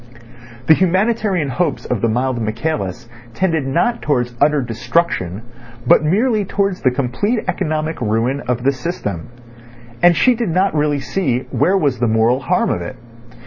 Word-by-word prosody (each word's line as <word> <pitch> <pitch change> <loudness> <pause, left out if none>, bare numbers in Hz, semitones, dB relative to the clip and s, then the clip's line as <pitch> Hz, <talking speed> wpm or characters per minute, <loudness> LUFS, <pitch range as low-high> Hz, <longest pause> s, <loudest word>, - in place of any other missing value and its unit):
The 160 - +7
humanitarian 190 -2 +1
hopes 155 +1 -1
of 120 -5 -2
the 115 - +2
mild 125 +1 -1
Michaelis 110 - -3 0.3
tended 165 -5 0
not 230 - 0
towards 125 -4 0
utter 150 0 +4
destruction, 115 - -1 0.4
but 125 - +5
merely 215 +7 +2
towards 195 -1 -1
the 130 - +4
complete 140 - -1
economic 155 -4 -2
ruin 115 +5 0
of 125 -1 -1
the 135 - +3
system. 125 - -5 0.7
And 175 -1 +5
she 255 - +4
did 235 -4 -2
not 185 +4 +1
really 150 -2 0
see 130 -10 -1
where 145 +10 +2
was 140 -8 0
the 120 - +1
moral 110 +3 +2
harm 185 - 0
of - - -2
it. - - -6
145 Hz, 155 wpm, -18 LUFS, 120-185 Hz, 0.7 s, The